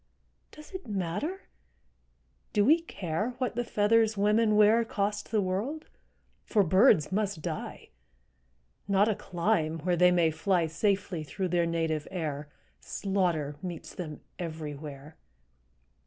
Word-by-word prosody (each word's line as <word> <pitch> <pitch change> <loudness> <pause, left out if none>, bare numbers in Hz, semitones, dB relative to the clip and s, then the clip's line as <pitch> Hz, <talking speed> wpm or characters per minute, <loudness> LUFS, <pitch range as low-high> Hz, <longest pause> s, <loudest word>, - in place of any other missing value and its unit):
Does 305 0 -13
it 375 -5 -7
matter, 210 - -3 1.1
do 205 -1 +3
we 320 +5 +5
care 210 - -3
What 255 -3 -2
the 240 - 0
feathers 220 0 +2
women 210 +2 +3
wear 215 +2 +5
Cost 210 -2 -2
the 215 -2 +2
world? 220 +13 -2 0.6
For 210 -3 +2
birds 185 - +4
must 195 -5 -1
die; - - -5 1.0
Not 200 +1 +4
a 220 - +2
clime 170 -4 0
where 180 +2 +1
they 180 +1 +6
may 170 -2 +3
fly 170 +2 +1
Safely 185 0 -1
through 185 +5 -3
their 170 -1 +2
native 160 -2 -1
air; 150 -5 -4 0.3
Slaughter 175 -7 -1
meets 175 -3 -7
them 155 -5 -7 0.2
everywhere. 150 -3 -7
190 Hz, 125 wpm, -29 LUFS, 160-215 Hz, 1.1 s, they